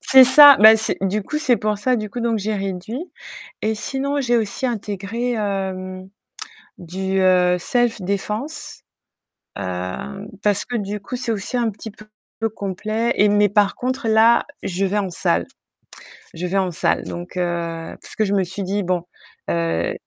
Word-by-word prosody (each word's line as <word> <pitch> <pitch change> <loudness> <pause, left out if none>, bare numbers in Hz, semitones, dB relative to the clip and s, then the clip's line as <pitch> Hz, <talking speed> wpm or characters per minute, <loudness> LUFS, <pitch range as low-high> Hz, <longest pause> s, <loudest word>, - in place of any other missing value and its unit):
C'est 265 -1 +7
ça, 280 +2 +9
bah 220 +1 +9
c'est 220 - -2
du 195 +2 0
coup, 300 +9 -3
c'est 265 -6 +2
pour 210 0 -1
ça 250 +4 +1
du 215 -2 -4
coup 245 - -5
donc 230 -1 0
j'ai 215 +2 -2
réduit 195 - -4 0.6
et 220 +1 0
sinon 275 +5 -2
j'ai 240 -2 +2
aussi 225 +4 -2
intégré, 225 +1 -3
hem, 190 -3 -3 0.7
du, 190 +2 -3
heu, 180 -1 +4
self 240 +4 0
défense, 210 - -4 0.8
heu, 90 - -5 0.2
parce 205 -1 +1
que 245 - -3
du 205 0 -4
coup, 200 +5 -6
c'est 245 -2 -3
aussi 220 +4 -3
un 235 -2 +1
petit 220 +2 -9
peu 215 +1 -16 0.5
complet 215 +4 -2
et 205 - +4
mais 205 0 +3
par 205 0 +2
contre 255 -1 -3
là, 225 +2 +5 0.2
je 190 +2 -1
vais 200 +2 0
en 195 -2 -2
salle. 85 - 0 0.9
Je 170 +2 -5
vais 190 +2 -1
en 190 -2 +1
salle, 165 - 0
donc 175 +1 -7
heu, 170 -2 -3
parce - - -13
que 215 - +1
je 200 - -1
me 195 -1 +2
suis 190 +3 -5
dit: 200 +2 -1
«Bon, 180 -1 -1 0.5
heu» 85 0 0
205 Hz, 175 wpm, -21 LUFS, 185-230 Hz, 0.9 s, ça